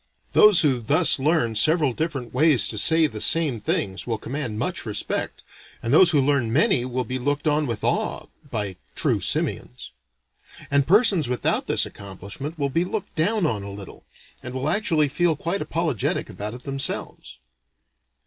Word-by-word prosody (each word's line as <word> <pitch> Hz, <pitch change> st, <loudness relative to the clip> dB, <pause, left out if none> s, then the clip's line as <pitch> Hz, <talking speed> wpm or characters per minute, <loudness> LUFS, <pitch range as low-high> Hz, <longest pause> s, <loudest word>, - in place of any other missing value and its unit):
Those 210 Hz, -6 st, +6 dB
who 135 Hz, -5 st, +2 dB
thus 145 Hz, +8 st, +3 dB
learn 140 Hz, -5 st, +1 dB
several 150 Hz, +4 st, +2 dB
different 135 Hz, -5 st, -4 dB
ways 145 Hz, -1 st, +4 dB
to 110 Hz, -, -1 dB
say 160 Hz, +6 st, +5 dB
the 110 Hz, -8 st, -5 dB
same 155 Hz, -8 st, +3 dB
things, 95 Hz, -1 st, -3 dB
will 115 Hz, -2 st, -1 dB
command 120 Hz, -1 st, -5 dB
much -, -, -2 dB
respect, -, -, -4 dB, 0.4 s
and 115 Hz, -, -1 dB
those 175 Hz, +3 st, +7 dB
who 155 Hz, -4 st, +3 dB
learn 135 Hz, -4 st, +1 dB
many 130 Hz, -1 st, +2 dB
will 130 Hz, 0 st, -3 dB
be 130 Hz, +2 st, -5 dB
looked 145 Hz, +4 st, -2 dB
on 150 Hz, 0 st, +1 dB
with 115 Hz, -3 st, -5 dB
awe -, -, -1 dB, 0.2 s
by 105 Hz, -6 st, -4 dB, 0.2 s
true -, -, +1 dB
simians. 60 Hz, -, -3 dB, 0.8 s
And 140 Hz, -1 st, +2 dB
persons 195 Hz, -, +4 dB
without 125 Hz, -1 st, -1 dB
this -, -, +2 dB
accomplishment 100 Hz, -, -8 dB
will 140 Hz, -2 st, -2 dB
be 165 Hz, +5 st, +1 dB
looked 200 Hz, +2 st, -5 dB
down 190 Hz, +4 st, +1 dB
on 110 Hz, -9 st, -1 dB
a 100 Hz, -, -8 dB
little, 100 Hz, -2 st, -11 dB, 0.4 s
and 125 Hz, -, -8 dB
will 130 Hz, +3 st, -2 dB
actually 160 Hz, -6 st, +1 dB
feel 165 Hz, +3 st, 0 dB
quite 170 Hz, +6 st, -3 dB
apologetic 160 Hz, -, -2 dB
about 105 Hz, +3 st, -6 dB
it 125 Hz, -, -12 dB
themselves. 135 Hz, 0 st, -4 dB
140 Hz, 170 wpm, -23 LUFS, 115-160 Hz, 0.8 s, those